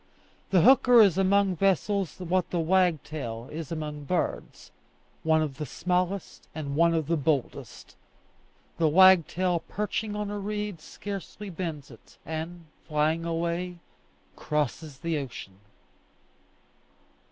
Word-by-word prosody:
The 185 Hz, -3 st, +4 dB
hooker 250 Hz, +1 st, +6 dB
is 200 Hz, -6 st, +6 dB
among 195 Hz, -1 st, +3 dB
vessels 195 Hz, -1 st, 0 dB
what 180 Hz, 0 st, 0 dB
the 175 Hz, -, -1 dB
wagtail 155 Hz, -9 st, 0 dB
is 160 Hz, -1 st, -6 dB
among 150 Hz, -2 st, -5 dB
birds 180 Hz, +5 st, -3 dB, 0.5 s
one 160 Hz, 0 st, +3 dB
of 140 Hz, -4 st, -5 dB
the 150 Hz, -, -2 dB
smallest 180 Hz, +6 st, -2 dB
and 140 Hz, -3 st, -4 dB
one 170 Hz, +2 st, +4 dB
of 160 Hz, -2 st, 0 dB
the 170 Hz, +3 st, +1 dB
boldest. 145 Hz, -3 st, -3 dB, 0.8 s
The 165 Hz, -, +4 dB
wagtail 180 Hz, +1 st, +5 dB
perching 210 Hz, +1 st, -3 dB
on 210 Hz, -1 st, -3 dB
a 205 Hz, -, -4 dB
reed 210 Hz, -3 st, -4 dB
scarcely 200 Hz, +3 st, -7 dB
bends 160 Hz, -6 st, -5 dB
it, 115 Hz, -, -17 dB
and, 165 Hz, +2 st, -6 dB, 0.2 s
flying 155 Hz, +2 st, 0 dB
away, 170 Hz, +2 st, -2 dB, 0.6 s
crosses 150 Hz, -1 st, -3 dB
the 165 Hz, 0 st, -2 dB
ocean. 100 Hz, -8 st, -8 dB
170 Hz, 120 wpm, -27 LUFS, 155-190 Hz, 0.8 s, hooker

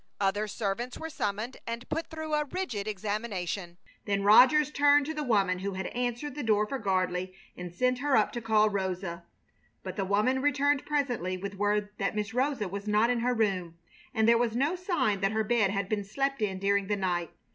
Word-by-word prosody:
Other 205 Hz, +2 st, +1 dB
servants 225 Hz, +4 st, -3 dB
were 320 Hz, 0 st, -6 dB
summoned 215 Hz, -1 st, -3 dB
and 235 Hz, +1 st, -5 dB
put 325 Hz, +2 st, -3 dB
through 315 Hz, -1 st, -6 dB
a 300 Hz, 0 st, +2 dB
rigid 280 Hz, -, -4 dB
examination. 200 Hz, -4 st, -3 dB, 0.3 s
Then 200 Hz, -1 st, 0 dB
Rogers 270 Hz, +8 st, +6 dB
turned 290 Hz, 0 st, +4 dB
to 315 Hz, -, -3 dB
the 305 Hz, -, -3 dB
woman 195 Hz, -7 st, +2 dB
who 195 Hz, +1 st, -3 dB
had 190 Hz, 0 st, -4 dB
answered 245 Hz, +3 st, -2 dB
the 295 Hz, -, -5 dB
door 215 Hz, -4 st, +2 dB
for 270 Hz, +5 st, -4 dB
Gardley 185 Hz, -2 st, -1 dB, 0.2 s
and 180 Hz, -1 st, -7 dB
sent 250 Hz, +7 st, 0 dB
her 285 Hz, 0 st, +2 dB
up 215 Hz, -, +2 dB
to 240 Hz, -, -5 dB
call 215 Hz, -1 st, +3 dB
Rosa. 185 Hz, -3 st, -3 dB, 0.6 s
But -, -, -6 dB
the 195 Hz, -, 0 dB
woman 215 Hz, +7 st, +2 dB
returned 285 Hz, 0 st, +1 dB
presently 245 Hz, -, -1 dB
with 200 Hz, +2 st, -5 dB
word 205 Hz, +1 st, 0 dB
that 195 Hz, +2 st, -1 dB
Miss 210 Hz, +1 st, -2 dB
Rosa 260 Hz, -4 st, 0 dB
was 200 Hz, +3 st, -6 dB
not 210 Hz, +3 st, +3 dB
in 245 Hz, -, 0 dB
her 245 Hz, +1 st, +1 dB
room, 185 Hz, -7 st, -1 dB, 0.3 s
and 220 Hz, -3 st, +2 dB
there 230 Hz, 0 st, +5 dB
was 235 Hz, -2 st, 0 dB
no 285 Hz, +8 st, +1 dB
sign 305 Hz, -, 0 dB
that 195 Hz, +2 st, +1 dB
her 220 Hz, 0 st, +1 dB
bed 215 Hz, -2 st, +2 dB
had 200 Hz, -1 st, -1 dB
been 205 Hz, 0 st, -1 dB
slept 275 Hz, +6 st, -2 dB
in 195 Hz, -3 st, -1 dB
during 200 Hz, 0 st, +1 dB
the 205 Hz, -, +1 dB
night. 175 Hz, -3 st, -1 dB
215 Hz, 205 wpm, -29 LUFS, 195-260 Hz, 0.6 s, Rogers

